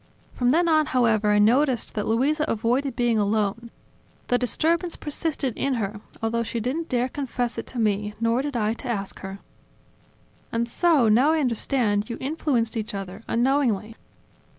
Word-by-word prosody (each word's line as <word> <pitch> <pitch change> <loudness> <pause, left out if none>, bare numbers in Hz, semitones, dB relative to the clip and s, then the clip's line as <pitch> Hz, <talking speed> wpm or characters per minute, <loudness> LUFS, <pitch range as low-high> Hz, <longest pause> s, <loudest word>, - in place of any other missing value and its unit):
From 245 -1 +1
then 340 +6 +3
on, 310 -2 +3
however, 225 -4 +2
I 210 - +4
noticed 245 +4 +2
that 210 - -2
Luisa 280 +7 +1
avoided 245 +4 0
being 240 -2 +2
alone; 210 +2 0 0.6
the 245 - +3
disturbance 330 +7 +1
persisted 295 -4 -3
in 275 -1 0
her, 210 -2 -3 0.2
although 230 +1 0
she 230 +1 -3
didn't 275 +9 -3
dare 250 -1 +1
confess 255 -3 -3
it - - -7
to 255 - -8
me, 210 -2 0
nor 230 +2 +2
did 280 -3 -3
I 215 -1 +1
to 255 - -8
ask 200 -5 -3
her." 195 0 -7 1.1
"And 230 +1 0
so, 295 -1 +3
now 250 +9 +4
I 320 - +2
understand, 230 -5 0
you 235 - -4
influenced 260 -5 -1
each 215 -2 -3
other, 195 +1 -6
unknowingly." 235 -4 +1
235 Hz, 165 wpm, -24 LUFS, 215-275 Hz, 1.1 s, I